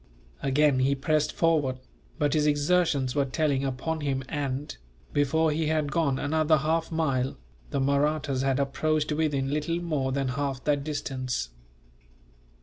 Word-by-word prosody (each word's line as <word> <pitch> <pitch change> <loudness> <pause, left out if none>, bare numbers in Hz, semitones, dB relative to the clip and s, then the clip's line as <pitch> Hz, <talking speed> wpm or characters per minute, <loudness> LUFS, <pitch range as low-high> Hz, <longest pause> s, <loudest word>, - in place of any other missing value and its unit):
Again 140 0 +3
he 135 +2 +2
pressed 150 +2 +1
forward, 150 -6 +1 0.4
but 145 -3 +1
his 150 -1 +2
exertions 145 -3 +2
were 145 - +2
telling 140 0 0
upon 140 +4 -2
him 135 -2 -1
and, 145 -1 -3 0.4
before 155 +3 +2
he 155 +1 0
had 155 -2 0
gone 140 -4 +1
another 155 +2 +2
half 160 +3 0
mile, 135 -6 0 0.3
the - - -1
Mahrattas 140 0 +1
had 135 0 +1
approached 150 +2 0
within 145 -3 0
little 155 +3 -1
more 150 -6 -1
than 135 -1 -1
half 135 0 -2
that 145 -2 +1
distance. 130 - -3
145 Hz, 145 wpm, -27 LUFS, 135-155 Hz, 0.4 s, Again